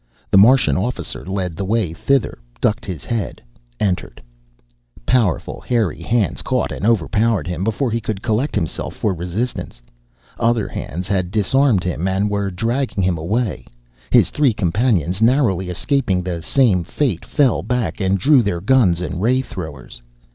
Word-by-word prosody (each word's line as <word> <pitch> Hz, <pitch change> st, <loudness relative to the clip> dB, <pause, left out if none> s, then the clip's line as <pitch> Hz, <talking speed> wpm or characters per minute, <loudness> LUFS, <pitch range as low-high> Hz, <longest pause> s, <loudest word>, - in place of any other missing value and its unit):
The -, -, +5 dB
Martian 125 Hz, +3 st, +5 dB
officer 120 Hz, +7 st, -3 dB
led 95 Hz, -3 st, -3 dB
the 100 Hz, -, -4 dB
way 100 Hz, -4 st, 0 dB
thither, 135 Hz, -, 0 dB, 0.2 s
ducked 105 Hz, -, 0 dB
his 90 Hz, -7 st, -6 dB
head, 115 Hz, -3 st, -3 dB, 0.4 s
entered 90 Hz, -4 st, -2 dB, 0.9 s
Powerful 115 Hz, -8 st, +1 dB
hairy 110 Hz, -9 st, -1 dB
hands 110 Hz, +2 st, 0 dB
caught -, -, -1 dB
and 100 Hz, -, -2 dB
overpowered 110 Hz, -3 st, +1 dB
him. 90 Hz, +1 st, -3 dB
Before 110 Hz, +4 st, 0 dB
he 115 Hz, +1 st, -1 dB
could 105 Hz, -2 st, -4 dB
collect 120 Hz, +5 st, 0 dB
himself 80 Hz, -, -3 dB
for 105 Hz, -, 0 dB
resistance, 90 Hz, -, -4 dB, 0.6 s
other 115 Hz, -2 st, +1 dB
hands 90 Hz, +4 st, -5 dB
had 95 Hz, -3 st, 0 dB
disarmed 110 Hz, +1 st, +2 dB
him 90 Hz, 0 st, -2 dB
and 95 Hz, +2 st, 0 dB
were 100 Hz, -1 st, -1 dB
dragging 115 Hz, +3 st, -1 dB
him 90 Hz, -3 st, 0 dB
away. 105 Hz, +7 st, -2 dB, 0.4 s
His -, -, +4 dB
three 145 Hz, -5 st, +2 dB
companions, 95 Hz, -, 0 dB
narrowly 115 Hz, -7 st, +2 dB
escaping 95 Hz, -, 0 dB
the 85 Hz, -2 st, -4 dB
same 100 Hz, -, +2 dB
fate, 115 Hz, -, -1 dB
fell 140 Hz, -6 st, +2 dB
back 125 Hz, -3 st, -2 dB
and 95 Hz, 0 st, +2 dB
drew 135 Hz, +7 st, +5 dB
their 100 Hz, -6 st, -1 dB
guns 95 Hz, -5 st, +3 dB
and 90 Hz, 0 st, -4 dB
ray 130 Hz, +4 st, +2 dB
throwers. 75 Hz, -, -8 dB
100 Hz, 155 wpm, -19 LUFS, 90-120 Hz, 0.9 s, The